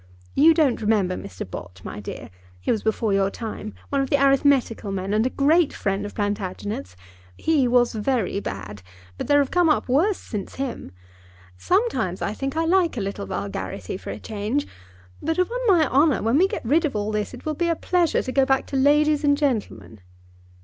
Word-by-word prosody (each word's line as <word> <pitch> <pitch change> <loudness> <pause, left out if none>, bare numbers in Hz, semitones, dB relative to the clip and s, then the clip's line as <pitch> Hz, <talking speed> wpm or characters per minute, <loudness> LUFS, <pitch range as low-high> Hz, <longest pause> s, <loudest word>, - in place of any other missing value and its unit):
You 320 +3 +6
don't 295 -8 +2
remember 205 -4 +1
Mr. 95 - -7
Bott, 90 0 -9
my 105 - -7
dear. 100 - -8 0.3
He - - -1
was 220 - 0
before 220 -1 0
your 195 0 +2
time; 215 0 -7
one 280 -1 +1
of 270 - -2
the 285 - +3
arithmetical 275 -6 +2
men, 195 +1 -3
and 220 +3 +2
a - - -1
great 300 +4 +3
friend 195 0 -2
of - - -11
Plantagenet's. 205 - -3 0.4
He 300 -5 +2
was 245 0 +3
very 220 -3 -1
bad, 100 - -6 0.4
but - - -3
there 290 - +4
have 280 -2 +2
come 355 -2 +3
up 305 - +1
worse 335 +11 +2
since 210 -4 -6
him. 260 - -5 0.6
Sometimes, 360 - 0
I 200 - -2
think, 270 +6 -4
I 325 - +1
like 345 -4 +2
a - - 0
little 195 - -4
vulgarity 95 - -4
for 190 - -8
a - - -4
change; 220 +6 -2 0.6
but, 325 +1 -1
upon 415 +8 0
my 340 -7 +5
honour, 280 0 +3
when 230 +6 +3
we 380 - +5
get 405 - -5
rid 305 +8 +3
of 290 -7 -1
all 210 +1 -1
this 210 +3 -2
it 245 - -14
will 310 - -1
be 345 +3 -1
a 335 - +1
pleasure 345 -1 +1
to 255 - -4
go 270 +1 +3
back 270 0 +1
to - - -6
ladies 295 +2 +3
and 285 -1 +3
gentlemen." 230 - -2
250 Hz, 200 wpm, -23 LUFS, 200-300 Hz, 0.6 s, You